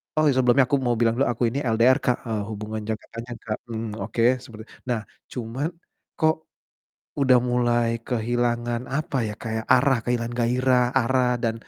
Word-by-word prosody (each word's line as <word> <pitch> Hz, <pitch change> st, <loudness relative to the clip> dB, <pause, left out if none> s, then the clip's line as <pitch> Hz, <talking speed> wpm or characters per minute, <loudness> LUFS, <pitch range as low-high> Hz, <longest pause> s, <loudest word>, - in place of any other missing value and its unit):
Oh, 155 Hz, 0 st, +3 dB
ya, -, -, +3 dB
sebelumnya 125 Hz, +2 st, +5 dB
aku 140 Hz, -, +3 dB
mau 120 Hz, -1 st, +2 dB
bilang 115 Hz, -1 st, +3 dB
dulu 135 Hz, -, +2 dB
aku 120 Hz, -, -3 dB
ini 130 Hz, +5 st, -2 dB
LDR, 120 Hz, +3 st, +5 dB
Kak, 125 Hz, -, +2 dB
eee, 110 Hz, -2 st, -1 dB
hubungan 110 Hz, 0 st, -5 dB
jangka 110 Hz, -1 st, -3 dB
panjang, 115 Hz, +1 st, -7 dB
Kak, 110 Hz, -1 st, -3 dB
mhm, 115 Hz, -1 st, -4 dB
oke, 115 Hz, +3 st, -3 dB, 0.2 s
seperti 110 Hz, -1 st, -10 dB, 0.3 s
nah, 120 Hz, -2 st, +1 dB, 0.3 s
cuman 125 Hz, +4 st, -3 dB, 0.5 s
kok 160 Hz, -1 st, +4 dB, 0.9 s
udah 130 Hz, -2 st, +6 dB
mulai 120 Hz, -1 st, +2 dB, 0.2 s
kehilangan, 120 Hz, 0 st, 0 dB
apa 150 Hz, -1 st, -2 dB
ya, -, -, -4 dB
kayak 110 Hz, -1 st, -3 dB
arah 135 Hz, +1 st, +4 dB
kehilangan 120 Hz, -1 st, -1 dB
gairah, 125 Hz, +1 st, +3 dB, 0.2 s
arah 130 Hz, +1 st, +2 dB, 0.2 s
dan 115 Hz, -2 st, +1 dB
120 Hz, 170 wpm, -24 LUFS, 115-130 Hz, 0.9 s, udah